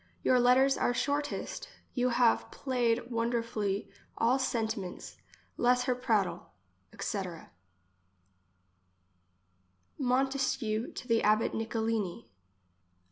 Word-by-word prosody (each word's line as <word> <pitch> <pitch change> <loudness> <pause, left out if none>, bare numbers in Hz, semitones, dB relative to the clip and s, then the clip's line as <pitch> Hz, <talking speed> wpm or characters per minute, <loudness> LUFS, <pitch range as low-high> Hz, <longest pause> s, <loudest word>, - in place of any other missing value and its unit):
Your 255 - +4
letters 260 +3 +4
are 245 - +1
shortest. 285 +3 -2 0.2
You 250 -1 +1
have 240 -1 +3
plaied 245 -2 -1
wonder 230 0 0
fully 205 -3 -2 0.3
all 245 +4 +3
sentiments; 220 -7 -3 0.4
less 250 +1 +3
her 250 0 +1
prattle, 215 - -1 0.4
etc. 185 -5 -5 2.5
Montesquieu 255 -3 0
to - - -8
the 230 -2 +3
abbot 215 +1 +3
Nicolini. 220 - -2
235 Hz, 90 wpm, -31 LUFS, 220-250 Hz, 2.5 s, Your